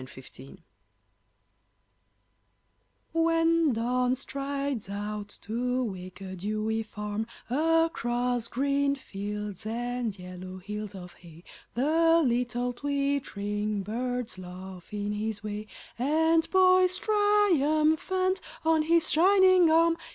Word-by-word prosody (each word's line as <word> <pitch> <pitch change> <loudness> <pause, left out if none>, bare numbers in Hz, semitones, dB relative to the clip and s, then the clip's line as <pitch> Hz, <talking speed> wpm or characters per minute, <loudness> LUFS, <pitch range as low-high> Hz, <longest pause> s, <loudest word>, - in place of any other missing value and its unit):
Alarm - - -11
Clocks 135 +5 -13 2.5
When 330 -1 +3
Dawn 250 +2 +1
strides 275 -3 -4
out 205 0 -5
to 250 +4 -1
wake 185 -3 -7
a 190 -1 -6
dewy 215 +4 -2
farm 210 0 -4 0.2
Across 250 -6 +1
green 280 +2 +1
fields 210 -4 -6
and 235 -1 -3
yellow 185 0 -8
hills 210 +2 -6
of 180 -2 -9
hay 170 -1 -15 0.3
The 325 +6 +4
little 245 0 0
twittering 220 -7 -2
birds 240 0 -3
laugh 185 +1 -10
in 205 0 -3
his 210 0 -3
way 210 0 -5 0.3
And 320 +5 +2
poise 370 -1 +5
triumphant 370 -3 +2 0.2
on 320 -1 +4
his 330 +1 +2
shining 370 0 +5
arm. 330 +1 +4
245 Hz, 100 wpm, -28 LUFS, 210-320 Hz, 2.5 s, poise